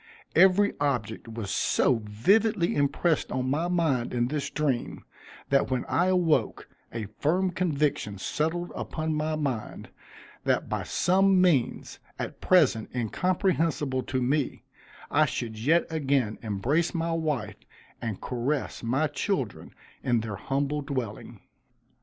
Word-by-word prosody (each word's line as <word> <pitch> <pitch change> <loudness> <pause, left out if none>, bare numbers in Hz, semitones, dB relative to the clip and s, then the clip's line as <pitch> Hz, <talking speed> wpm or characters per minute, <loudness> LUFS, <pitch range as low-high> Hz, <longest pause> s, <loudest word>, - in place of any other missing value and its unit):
Every 190 +3 +5
object 120 -6 -1
was 110 -3 -5
so 120 -3 +2
vividly 190 - +2
impressed 145 +3 +1
on 130 0 -1
my 160 +5 0
mind 160 -10 0
in 120 0 +1
this 145 -1 -2
dream, 140 -6 -2 0.4
that 140 0 +3
when 130 -1 -1
I 175 - +1
awoke, 180 -4 +1 0.2
a 115 -2 -4
firm 180 +5 +2
conviction 150 - -1
settled 160 - -2
upon 160 0 -3
my 155 +1 -1
mind, 135 -8 -3 0.5
that - - +1
by - - -2
some 190 +1 +3
means, 170 -9 +1 0.2
at - - -6
present 140 -12 +3
incomprehensible 160 - 0
to 130 0 -2
me, 140 +2 0 0.5
I - - +4
should 110 -2 -4
yet 160 +9 +3
again 135 -8 0
embrace 120 - 0
my 165 0 -1
wife, 150 -10 -2 0.4
and 110 -4 -3
caress 130 +4 -2
my 130 +6 +1
children 145 - -2 0.3
in 120 -3 +1
their 110 -2 -4
humble 140 +7 -1
dwelling. 130 -7 -5
145 Hz, 130 wpm, -27 LUFS, 120-170 Hz, 0.5 s, Every